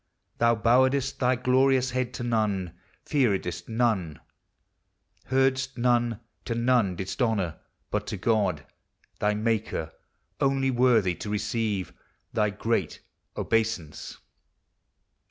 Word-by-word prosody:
Thou 115 0 +4
bowedest 130 +4 +2
thy 125 0 +3
glorious 130 +1 +2
head 125 -1 -1
to - - -4
none, 105 -7 0 0.3
fearedst 95 - 0
none, 110 - 0 1.1
Heardst 135 0 +1
none, 120 -2 +1 0.3
to 115 - -2
none 115 -5 +2
didst 95 +8 -5
honor, 100 -9 0 0.3
but - - -2
to - - -3
God 100 -9 0 0.5
Thy 105 0 +1
Maker, 110 -7 -1 0.5
only 135 -1 +2
worthy 120 -7 +3
to 105 - -7
receive 105 -2 -2 0.4
Thy 105 -1 +2
great 105 -3 -2 0.4
obeisance. 110 -9 -1
115 Hz, 105 wpm, -27 LUFS, 100-125 Hz, 1.1 s, Thou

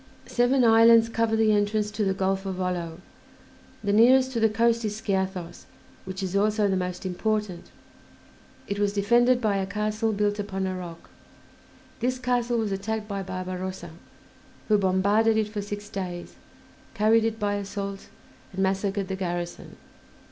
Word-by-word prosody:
Seven 250 +2 +2
islands 230 0 +6
cover 230 -1 0
the 220 -1 +3
entrance 210 0 +1
to 210 - -2
the 195 -1 0
Gulf 195 0 0
of 190 - -3
Volo. 180 -2 -3 0.8
The 200 0 0
nearest 255 +4 +5
to 235 - -2
the 225 0 +4
coast 230 +1 +2
is 210 0 -3
Skiathos, 190 -4 -3 0.4
which 190 +1 -5
is 190 0 -3
also 210 +1 +2
the 195 - +1
most 180 0 -3
important; 205 0 -2 1.0
it 200 0 -3
was 205 -1 +1
defended 240 +5 +3
by 215 -4 +1
a 190 -1 -2
castle 215 +2 -1
built 205 0 0
upon 195 -2 -3
a 185 0 -2
rock. 175 -2 -9 0.9
This 250 +2 0
castle 245 -1 0
was 220 -3 -1
attacked 210 +2 -3
by 200 -2 -3
Barbarossa, 185 -1 -5 0.8
who 210 -1 +4
bombarded 200 +4 +2
it 215 -1 0
for 210 -1 -4
six 205 0 -6
days, 180 -3 -6 0.6
carried 220 +2 +4
it 225 0 -1
by 205 -1 0
assault, 200 0 -5 0.5
and 190 +1 -1
massacred 195 +1 -1
the 190 - -3
garrison. 175 -2 -5
205 Hz, 155 wpm, -26 LUFS, 190-220 Hz, 1.0 s, islands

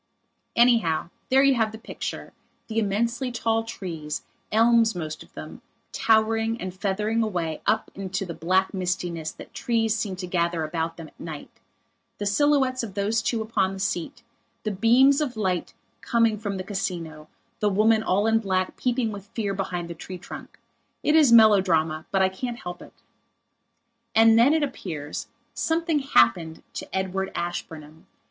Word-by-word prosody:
Anyhow, 225 -10 +3 0.2
there 265 +1 +5
you 275 -1 +5
have 225 -3 +1
the 220 - -8
picture, 220 - -6 0.3
the 225 0 -1
immensely 235 +5 0
tall 225 -1 0
trees, 170 -9 -5 0.3
elms 230 -1 +4
most 155 -3 -5
of - - -14
them, - - -9 0.3
towering 225 +1 +2
and 185 -4 -5
feathering 210 +4 -1
away 175 -8 -2
up 220 +1 +1
into 195 0 -4
the 170 - -6
black 185 +5 +1
mistiness 175 -4 -2
that - - -12
trees 225 -2 0
seem 210 -4 -2
to 185 0 -5
gather 170 -2 0
about 165 +1 -3
them 165 -2 -9
at - - -32
night; 155 -3 -8 0.7
the 205 - -4
silhouettes 265 +3 +2
of 210 -5 -7
those 210 +3 +1
two 225 -1 -1
upon 200 -4 0
the 195 - -7
seat; 230 - -3 0.4
the 215 - -1
beams 250 +8 +4
of 255 -6 -2
light 185 -5 -1 0.3
coming 230 -2 +2
from 205 -2 -3
the 185 - -4
Casino, 170 -6 -4 0.3
the 210 - +2
woman 215 +2 +3
all 205 -1 +1
in 225 0 +3
black 185 -3 -1
peeping 245 -3 0
with 200 -1 -9
fear 205 -4 -1
behind 180 -3 -3
the 170 - -6
tree 180 +3 -8
trunk. 180 - -10 0.5
It 300 - +3
is 300 -6 +6
melodrama; 185 -8 +5
but 195 -1 +2
I 190 - +3
can't 235 +5 -5
help 175 0 -7
it. - - -16 1.1
And 225 0 +7
then, 245 +5 +6
it 315 - +2
appears, 160 - -5 0.3
something 325 -1 0
happened 160 - +2
to - - -6
Edward 190 0 -2
Ashburnham. 160 -3 -6
200 Hz, 165 wpm, -25 LUFS, 175-230 Hz, 1.1 s, And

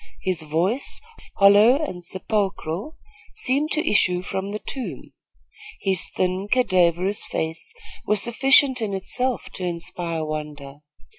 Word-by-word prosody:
His 185 -4 0
voice, 170 - -1 0.4
hollow 205 +5 +6
and 180 - -5
sepulchral, 195 - -3 0.4
seemed 280 +4 0
to 310 +1 0
issue 180 -3 +2
from 190 +1 -4
the 210 - -3
tomb. 215 - -7 0.7
His 190 -1 +1
thin, 185 +2 -1
cadaverous 185 -4 +2
face 160 - -3 0.3
was 210 -1 +2
sufficient 260 +3 +4
in 205 -3 -2
itself 250 +6 -1
to 185 - -6
inspire 170 -1 -2
wonder. 150 -2 -6
190 Hz, 120 wpm, -23 LUFS, 170-230 Hz, 0.7 s, hollow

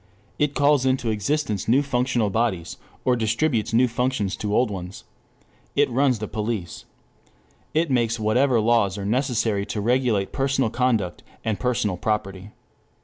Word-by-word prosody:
It 145 -1 +1
calls 145 -2 +3
into 130 -3 +1
existence 110 -1 -1
new 130 +5 +4
functional 125 -5 0
bodies, 95 -6 -1 0.3
or 125 - +3
distributes 115 +1 0
new 120 +3 +4
functions 120 -4 -1
to 105 0 -2
old 125 -3 +2
ones. 90 -1 -7 0.7
It - - +3
runs 130 0 +2
the 110 0 -5
police. 105 -6 -4 0.9
It 160 -1 +1
makes 115 -2 +1
whatever 120 +4 +2
laws 110 -3 +2
are 100 - -5
necessary 115 -3 0
to 105 - -3
regulate 115 -3 +1
personal 135 -4 0
conduct 115 -8 0 0.2
and 110 -2 -1
personal 110 -7 0
property. 100 -1 -3
115 Hz, 145 wpm, -23 LUFS, 105-130 Hz, 0.9 s, new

